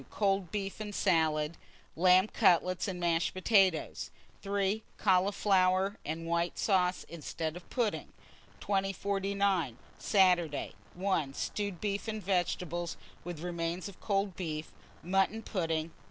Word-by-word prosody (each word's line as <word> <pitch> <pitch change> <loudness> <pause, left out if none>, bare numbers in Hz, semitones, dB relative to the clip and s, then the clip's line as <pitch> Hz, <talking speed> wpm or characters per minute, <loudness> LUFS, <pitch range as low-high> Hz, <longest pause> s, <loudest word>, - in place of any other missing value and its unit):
Cold 195 -3 0
beef 195 -1 -3
and 210 -1 -5
salad, 160 -3 +2 0.4
lamb 185 +2 +6
cutlets 185 -4 +3
and 185 -2 -4
mashed 170 +1 +1
potatoes. 185 -4 +2 0.3
3. 200 +1 0 0.2
Cauliflowers 190 0 +3
and 160 +2 -4
white 170 +1 0
sauce 185 -3 +2
instead 160 0 -4
of 175 - -11
pudding. 235 -5 -1 0.5
2049. 195 - 0 0.2
Saturday. 180 -7 +2 0.2
1. 175 -7 0
Stewed 200 -4 -3
beef 205 +2 -2
and 215 -2 -4
vegetables, 175 -2 -1 0.3
with 175 -3 -6
remains 170 +1 -3
of 200 - -11
cold 195 -2 0
beef; 155 -4 -4 0.3
mutton 195 +5 +1
pudding. 165 -5 -2
185 Hz, 115 wpm, -31 LUFS, 170-200 Hz, 0.5 s, lamb